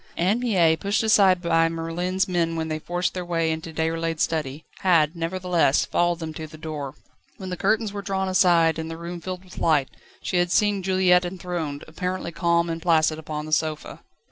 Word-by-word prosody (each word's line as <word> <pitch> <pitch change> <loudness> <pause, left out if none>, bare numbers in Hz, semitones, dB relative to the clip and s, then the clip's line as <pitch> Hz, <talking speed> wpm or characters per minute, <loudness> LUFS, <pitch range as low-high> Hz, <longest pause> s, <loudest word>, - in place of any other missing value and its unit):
Anne 190 +7 +2
Mie, 185 -10 +3
pushed 200 +6 -1
aside 195 -4 +4
by 165 -1 +3
Merlin's 170 +3 -2
men 170 -2 0
when 160 0 -3
they 155 0 -2
forced 175 +3 -2
their 180 - -4
way 165 -2 0
into 160 +1 -5
Déroulède's 165 0 -1
study, 155 -2 -3
had, 165 -4 +3
nevertheless, 170 -3 +1
followed 175 0 +1
them 160 -2 -6
to 155 0 -7
the 155 0 -13
door. 150 -3 -6 0.4
When 190 -1 -7
the - - -2
curtains 220 +2 0
were 200 - -4
drawn 190 -1 -2
aside 175 -3 +3
and 160 0 -4
the 165 - -6
room 170 +1 -7
filled 185 +1 -6
with 185 - -11
light, 150 -5 +2 0.3
she 180 - -1
had 175 0 +1
seen 205 -1 +2
Juliette 185 -1 +3
enthroned, 175 -5 -4
apparently 180 +2 -4
calm 170 -1 +1
and 165 0 -4
placid, 160 -2 +2
upon 150 -1 -5
the 155 - -8
sofa. 155 0 -1
170 Hz, 195 wpm, -24 LUFS, 160-185 Hz, 0.4 s, aside